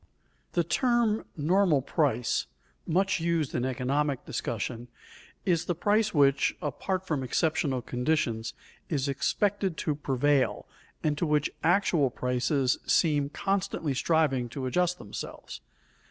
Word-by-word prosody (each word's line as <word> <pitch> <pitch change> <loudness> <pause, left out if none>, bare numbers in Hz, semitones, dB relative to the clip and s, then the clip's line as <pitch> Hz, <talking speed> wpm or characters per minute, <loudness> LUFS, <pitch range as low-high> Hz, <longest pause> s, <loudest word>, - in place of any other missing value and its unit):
_ - - -38
The - - +2
term 240 -4 +1
"normal 160 -2 +3
price," 130 -7 0 0.4
much 190 +3 +2
used 165 -4 0
in 120 - 0
economic 130 +2 -1
discussion, 120 +2 -4 0.6
is 170 -4 +1
the 175 - -1
price 210 +5 +2
which, 140 -2 +3
apart 185 +6 -3
from 150 -6 -1
exceptional 145 -1 0
conditions, 125 -4 -1 0.3
is 145 -4 0
expected 190 +6 0
to 150 - 0
prevail, 140 -1 +1 0.4
and 150 -1 +1
to 170 - +1
which 150 -1 +1
actual 170 -5 +3
prices 125 +2 0
seem 145 -4 +3
constantly 185 -5 -1
striving 135 -4 +1
to 130 +2 -5
adjust 180 +6 +1
themselves. 100 - -8
150 Hz, 125 wpm, -28 LUFS, 130-175 Hz, 0.6 s, normal